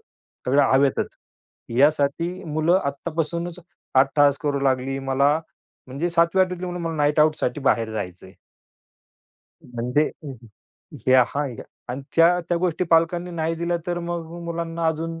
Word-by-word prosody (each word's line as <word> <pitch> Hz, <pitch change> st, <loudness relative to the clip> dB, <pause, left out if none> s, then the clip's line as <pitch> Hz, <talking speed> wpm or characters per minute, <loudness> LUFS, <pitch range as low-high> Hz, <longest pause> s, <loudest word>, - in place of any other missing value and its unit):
सगळ्या 140 Hz, +3 st, -1 dB
हवेतच. 135 Hz, 0 st, +2 dB, 0.7 s
यासाठी 145 Hz, +4 st, +2 dB
मुलं 160 Hz, +3 st, +2 dB
आत्तापासूनच 170 Hz, +4 st, -3 dB, 0.4 s
अट्टहास 140 Hz, +1 st, +4 dB
करू 145 Hz, -2 st, 0 dB
लागली, 135 Hz, 0 st, 0 dB
मला 135 Hz, +2 st, +2 dB, 0.5 s
म्हणजे 140 Hz, +7 st, -3 dB
7वी-8वी 180 Hz, +2 st, +2 dB
तली 180 Hz, -, -5 dB
मुलं 180 Hz, 0 st, -4 dB
मला 165 Hz, -1 st, -3 dB
नाईटआउटसाठी 150 Hz, -2 st, +2 dB
बाहेर 115 Hz, -4 st, +1 dB
जायचंय. 95 Hz, -3 st, -6 dB, 1.3 s
म्हणजे 125 Hz, +5 st, 0 dB, 0.2 s
हं, 140 Hz, -, -6 dB
हं. 120 Hz, -2 st, -15 dB, 0.6 s
हे 130 Hz, -, +5 dB
हां. 130 Hz, +3 st, +3 dB, 0.4 s
आणि 130 Hz, +3 st, -5 dB
त्या 170 Hz, +2 st, +6 dB
त्या 175 Hz, -, +1 dB
गोष्टी 180 Hz, 0 st, 0 dB
पालकांनी 170 Hz, +2 st, +2 dB
नाही 165 Hz, -1 st, -2 dB
दिल्या, 170 Hz, +1 st, -1 dB
तर 175 Hz, -1 st, -1 dB
मग 170 Hz, -1 st, -4 dB, 0.2 s
मुलांना 170 Hz, 0 st, -3 dB
अजून, 165 Hz, +1 st, -2 dB
155 Hz, 130 wpm, -23 LUFS, 135-170 Hz, 1.3 s, त्या